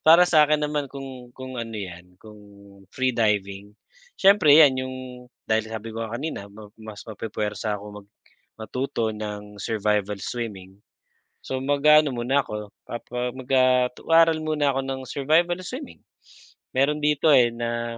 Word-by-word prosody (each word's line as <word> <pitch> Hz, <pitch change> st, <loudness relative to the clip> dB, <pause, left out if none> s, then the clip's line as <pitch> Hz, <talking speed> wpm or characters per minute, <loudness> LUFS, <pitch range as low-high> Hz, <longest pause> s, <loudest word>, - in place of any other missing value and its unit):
Para 165 Hz, +3 st, +7 dB
sa 155 Hz, -4 st, +4 dB
akin 150 Hz, 0 st, +2 dB
naman 150 Hz, -1 st, -2 dB
kung 130 Hz, -2 st, -9 dB
kung 130 Hz, -2 st, -6 dB
ano 115 Hz, -1 st, -6 dB
'yan 90 Hz, -2 st, -9 dB
kung 105 Hz, +2 st, -15 dB, 0.5 s
free 130 Hz, +4 st, -1 dB
diving. 105 Hz, -2 st, -1 dB, 0.4 s
Siyempre 190 Hz, -7 st, +6 dB
'yan 140 Hz, -5 st, +6 dB
yung 130 Hz, -, -6 dB, 0.5 s
dahil 110 Hz, 0 st, 0 dB
sabi 110 Hz, 0 st, -6 dB
ko 115 Hz, -, -5 dB
nga 115 Hz, +1 st, -5 dB
kanina 120 Hz, -8 st, -5 dB
ma 105 Hz, +1 st, -13 dB
mas 110 Hz, -1 st, -10 dB
mapu-puwersa 105 Hz, -1 st, -4 dB
ako 100 Hz, -, -11 dB, 0.2 s
mag -, -, -35 dB, 0.5 s
matuto 115 Hz, 0 st, -3 dB
ng 105 Hz, -1 st, -7 dB
survival 105 Hz, -2 st, -1 dB
swimming. 100 Hz, -5 st, -6 dB, 0.6 s
So 130 Hz, -, -4 dB
mag-aano 145 Hz, +2 st, +4 dB
muna 130 Hz, +3 st, 0 dB
ako, 105 Hz, -1 st, -6 dB, 0.2 s
papa 125 Hz, +1 st, -5 dB
mag 130 Hz, -1 st, -10 dB
ah, 125 Hz, -1 st, +4 dB
mag-aaral 165 Hz, 0 st, +4 dB
muna 150 Hz, -2 st, +1 dB
ako 135 Hz, -, -1 dB
ng 135 Hz, 0 st, -4 dB
survival 165 Hz, +5 st, +2 dB
swimming. 260 Hz, +7 st, -8 dB, 0.8 s
Meron 150 Hz, +3 st, +2 dB
dito 150 Hz, +1 st, +3 dB
eh, 125 Hz, -3 st, +6 dB
na, 115 Hz, 0 st, -3 dB
120 Hz, 150 wpm, -24 LUFS, 105-145 Hz, 0.8 s, Para